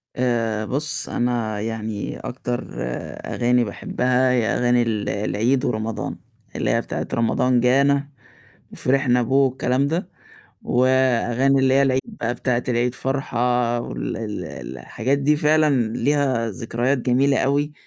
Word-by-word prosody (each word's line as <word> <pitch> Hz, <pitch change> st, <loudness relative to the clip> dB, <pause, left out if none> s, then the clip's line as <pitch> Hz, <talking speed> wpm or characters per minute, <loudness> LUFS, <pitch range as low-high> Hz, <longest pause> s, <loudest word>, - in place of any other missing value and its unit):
آآ 115 Hz, -4 st, 0 dB
بُصّ، 145 Hz, +5 st, -3 dB
أنا 115 Hz, -3 st, -1 dB
يعني 110 Hz, -2 st, -4 dB
أكتر 125 Hz, -1 st, -4 dB, 0.6 s
أغاني 120 Hz, 0 st, +2 dB
باحبها 125 Hz, +4 st, 0 dB
هي 120 Hz, -3 st, +2 dB
أغاني 120 Hz, 0 st, +2 dB
ال 110 Hz, -3 st, -1 dB
العيد 115 Hz, +5 st, 0 dB
ورمضان، 110 Hz, -1 st, -2 dB, 0.4 s
اللي -, -, -1 dB
هي -, -, +2 dB
بتاعة -, -, -4 dB
رمضان 120 Hz, +2 st, +2 dB
جانا 140 Hz, +3 st, +3 dB, 0.6 s
وفرحنا 130 Hz, -2 st, +2 dB
به 120 Hz, +2 st, -3 dB
والكلام 135 Hz, 0 st, +2 dB
ده، 170 Hz, +5 st, -2 dB, 0.5 s
وأغاني 130 Hz, +1 st, +2 dB
اللي 130 Hz, 0 st, +3 dB
هي 140 Hz, -, +5 dB
العيد 130 Hz, -1 st, +2 dB, 0.2 s
بتاعة 120 Hz, 0 st, 0 dB
العيد 120 Hz, +1 st, +1 dB
فرحة 125 Hz, -3 st, 0 dB
وال -, -, -4 dB
ال 105 Hz, -5 st, -5 dB, 0.3 s
الحاجات 125 Hz, -, -1 dB
دي 145 Hz, +2 st, +2 dB
فعلًا 150 Hz, -7 st, +2 dB
ليها 135 Hz, -5 st, +1 dB
ذكريات 120 Hz, +6 st, -1 dB
جميلة 130 Hz, +2 st, +2 dB
أوي 145 Hz, +2 st, +1 dB
125 Hz, 125 wpm, -22 LUFS, 115-135 Hz, 0.6 s, هي